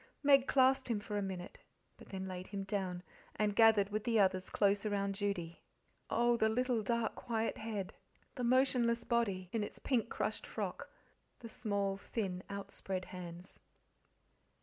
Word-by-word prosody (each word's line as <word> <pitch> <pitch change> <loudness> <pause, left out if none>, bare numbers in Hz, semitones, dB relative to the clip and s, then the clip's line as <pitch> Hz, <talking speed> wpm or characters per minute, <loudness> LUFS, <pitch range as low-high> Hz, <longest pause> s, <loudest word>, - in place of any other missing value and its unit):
Meg 275 -2 +6
clasped 265 0 +4
him 230 -4 0
for 210 0 -5
a 205 - +1
minute, 185 -2 -5 0.4
but - - -15
then 190 -1 -4
laid 185 0 -6
him 200 -1 -4
down, 190 -3 -2 0.3
and 210 -1 +1
gathered 220 -3 +6
with 215 0 -1
the 230 -2 +2
others 185 -2 +2
close 200 -1 +2
around 200 -2 0
Judy. 195 -5 -3 0.5
Oh, 240 0 +3
the 220 -1 +3
little 245 0 +1
dark, 230 +2 0
quiet 225 -1 -2
head, 215 -4 -4 0.4
the 250 - -4
motionless 240 -2 +3
body, 200 -6 0
in 225 -2 0
its - - -6
pink, 240 -4 0
crushed - - -2
frock, - - -4 0.5
the 230 - -8
small, 200 -3 -1
thin, 195 -3 -3
outspread 195 -1 -4
hands! 175 0 -8
205 Hz, 155 wpm, -35 LUFS, 195-235 Hz, 0.5 s, Meg